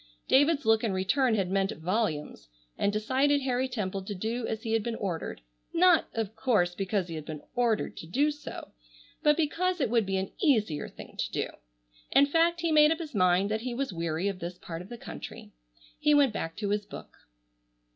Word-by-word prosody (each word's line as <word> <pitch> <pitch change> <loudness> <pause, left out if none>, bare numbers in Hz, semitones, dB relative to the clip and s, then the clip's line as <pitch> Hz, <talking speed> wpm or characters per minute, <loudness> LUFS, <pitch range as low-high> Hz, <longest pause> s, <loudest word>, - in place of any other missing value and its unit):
David's 290 +2 +4
look 225 0 +4
in 220 -4 0
return 225 +6 +2
had 190 -3 -1
meant 195 +1 +1
volumes, 160 - -2 0.3
and 200 - +1
decided 265 +7 +2
Harry 260 0 0
Temple 200 -6 -3
to 205 - -4
do 225 +5 -2
as 220 0 -4
he 225 - -2
had 225 - +3
been 230 +2 -3
ordered, 175 - -4 0.3
not, 350 0 +5
of 220 -1 -2
course, 205 -9 +2
because 195 0 -1
he 165 - -7
had 155 -1 -5
been 155 -2 -7
ordered 235 -3 +1
to 165 - -8
do 285 - +2
so, 295 0 -8 0.5
but 300 -1 +4
because 355 +3 0
it 260 -6 0
would 230 -4 +2
be 195 0 0
an 190 0 -3
easier 215 - +2
thing - - -12
to - - -2
do. - - -1 0.6
In 280 - +6
fact 330 +3 +2
he 335 -1 +1
made 300 0 +6
up 325 - +1
his 320 -3 -7
mind 185 0 +3
that 220 +1 -1
he 245 0 -4
was 270 -5 -2
weary 165 +2 -1
of 195 -2 -3
this 175 +1 -6
part 165 -2 -7
of 180 - -11
the 240 - -7
country. - - -9 0.5
He 300 0 +4
went 280 -6 +4
back 165 -5 -4
to 210 -2 -2
his 205 0 0
book. - - -10
220 Hz, 205 wpm, -29 LUFS, 190-275 Hz, 0.6 s, In